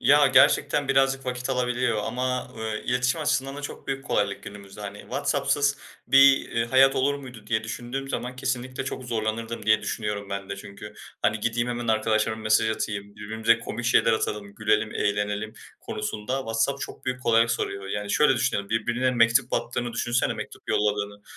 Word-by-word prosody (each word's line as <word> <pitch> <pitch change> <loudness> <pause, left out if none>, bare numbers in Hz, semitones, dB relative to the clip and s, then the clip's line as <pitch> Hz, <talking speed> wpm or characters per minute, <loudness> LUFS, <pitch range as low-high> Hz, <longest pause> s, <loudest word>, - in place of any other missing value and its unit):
Ya, 145 +1 +6
gerçekten 135 +2 +4
birazcık 135 -1 +2
vakit 125 +1 -3
alabiliyor 125 -2 0
ama, 125 +2 -2
ııı, 110 -1 -3
iletişim 125 +4 0
açısından 140 -2 0
da 145 - -7
çok - - -7
büyük 135 0 -3
kolaylık 100 -1 -1
günümüzde. 100 0 -11
Hani, 100 0 -6
"WhatsApp'sız 145 -1 0 0.3
bir, 135 +1 +6
ııı, 115 - +2
hayat 135 +2 +5
olur 140 +2 +2
muydu?" 125 -6 -10
diye 110 0 0
düşündüğüm 120 +5 -5
zaman 125 -1 -4
kesinlikle 130 0 -3
çok 130 -1 -5
zorlanırdım 115 -1 -3
diye 110 0 +4
düşünüyorum. 105 -2 -3
Ben 100 -1 -4
de 100 - -4
çünkü, 100 +1 -10 0.3
hani, 105 +1 +1
gideyim 120 +2 0
hemen 120 -1 -3
arkadaşlarıma 110 0 +1
mesaj 110 +1 +3
atayım, 100 -2 -4
birbirimize 110 +2 +1
komik 115 +1 -5
şeyler 120 - +4
atalım, 105 -2 -2
gülelim, 110 0 +1
eğlenelim 105 +1 -1 0.3
konusunda 105 +4 -3
WhatsApp 115 +2 -1
çok - - -7
büyük 130 0 -3
kolaylık 115 0 +4
soruyor. 100 -3 -2
Yani 105 0 -3
şöyle 145 +1 +4
düşünelim: 115 -5 -1
Birbirine 120 +3 +1
mektup 120 +1 +3
attığını 120 0 -2
düşünsene, 120 +1 0
mektup - - -8
yolladığını. 105 -1 0
115 Hz, 165 wpm, -25 LUFS, 105-130 Hz, 0.3 s, Ya